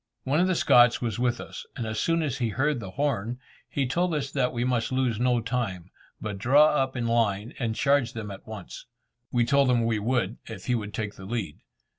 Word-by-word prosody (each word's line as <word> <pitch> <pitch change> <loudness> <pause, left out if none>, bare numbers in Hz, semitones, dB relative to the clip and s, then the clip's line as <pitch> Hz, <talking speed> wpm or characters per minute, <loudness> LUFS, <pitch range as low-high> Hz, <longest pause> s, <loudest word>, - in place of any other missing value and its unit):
One 140 +4 +1
of 180 - +3
the 185 - +1
Scots 120 -5 +5
was 115 -2 -3
with 120 -1 +1
us, - - -8
and 120 - -3
as 110 0 -3
soon 165 0 +1
as 140 -3 -2
he 120 -3 0
heard 140 +4 0
the 100 -5 -7
horn, 125 -1 -1 0.3
he 140 - 0
told 170 +6 0
us 135 -2 -2
that 130 -3 +1
we 120 -1 -2
must 125 +1 0
lose 130 -4 0
no 125 -1 +2
time, 110 -7 -3 0.3
but 105 -2 -5
draw 145 +8 +6
up 135 -2 0
in 120 - -1
line, 115 -1 +1
and 115 -3 -1
charge 140 -3 +2
them 105 -3 -6
at 95 - -11
once. 110 0 -9 0.4
We 120 -1 +2
told 140 +1 +3
him 120 -2 +3
we 115 -2 +1
would, 115 -1 0
if 110 - -8
he 125 - +1
would 105 -3 -3
take 105 -2 -4
the 95 - -9
lead. 100 -8 -4
120 Hz, 225 wpm, -27 LUFS, 110-135 Hz, 0.4 s, draw